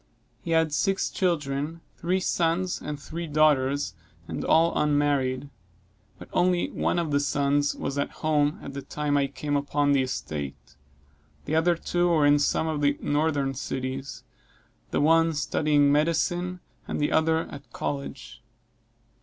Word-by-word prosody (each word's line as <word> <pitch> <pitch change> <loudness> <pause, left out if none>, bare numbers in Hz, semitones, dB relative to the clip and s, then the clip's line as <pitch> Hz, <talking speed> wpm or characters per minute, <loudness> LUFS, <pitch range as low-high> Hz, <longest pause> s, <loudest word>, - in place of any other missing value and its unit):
He - - -8
had 160 -2 +2
six 195 +6 +1
children, 155 -2 -1
three 180 +3 0
sons 175 0 0
and 150 -1 -5
three 165 +4 -6
daughters, 145 - +2 0.3
and 80 - -4
all 165 +1 +4
unmarried; 145 -2 +1 0.7
but - - -11
only 180 0 +2
one - - 0
of 165 -3 -1
the 145 - +3
sons 145 0 +1
was 140 - -3
at 140 - 0 0.2
home, 150 -1 +2
at 140 - -7
the 140 - -5
time 150 +1 -2
I 140 -1 +2
came 145 +1 -3
upon 145 0 +1
the 140 -1 +4
estate; 75 - -5 0.7
the 150 - -3
other 165 +2 +3
two 175 +1 0
were 160 -4 +3
in 145 0 +5
some 160 +2 +1
of 155 -2 -2
the 145 0 +2
northern 145 -2 0
cities 130 0 -5 0.7
the - - 0
one 165 +2 +4
studying 145 -1 +2
medicine, 175 +4 0 0.3
and - - -3
the 150 - +1
other 160 0 +3
at 140 0 -11
college. 125 -4 -5
145 Hz, 150 wpm, -26 LUFS, 140-160 Hz, 0.7 s, in